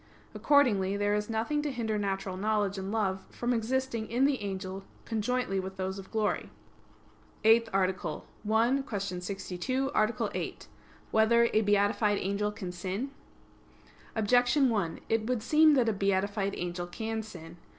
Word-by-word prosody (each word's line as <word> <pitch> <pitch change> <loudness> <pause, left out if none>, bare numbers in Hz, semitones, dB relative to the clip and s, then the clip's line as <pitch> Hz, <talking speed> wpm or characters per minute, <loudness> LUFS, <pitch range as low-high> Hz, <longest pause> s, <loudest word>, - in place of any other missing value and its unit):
Accordingly 210 -5 +3
there 205 0 +1
is 210 +1 -1
nothing 230 +7 0
to 295 -1 -2
hinder 220 -4 -2
natural 195 -2 -2
knowledge 205 0 0
and 190 +1 -4
love 195 -4 0
from 240 +1 -1
existing 235 -1 -1
in 245 +4 +2
the 280 -4 +1
angel 195 -1 -4 0.2
conjointly 225 -2 -1
with 190 0 -6
those 190 +1 -3
of 190 - -10
glory. 220 -2 -1 0.9
_______________________ - - -11
EIGHTH 225 0 +6
ARTICLE 185 -5 -1 0.3
[I, 235 +5 +3
Q. 210 -5 -2 0.2
62, 200 +8 -2
Art. 215 +2 +1
8] - - -5 0.4
Whether 235 +2 +4
a 215 - +4
Beatified 205 0 +2
Angel 200 +2 -1
Can 190 -4 -6
Sin? 190 +9 -4 1.0
Objection 245 +4 +3
1: 195 -7 -1
It 225 -1 0
would 245 -3 -1
seem 305 +3 +5
that 250 -4 +3
a 225 - +2
beatified 200 +1 0
angel 175 0 -3
can 220 +4 -3
sin. 170 -6 -11
210 Hz, 150 wpm, -30 LUFS, 195-235 Hz, 1.0 s, EIGHTH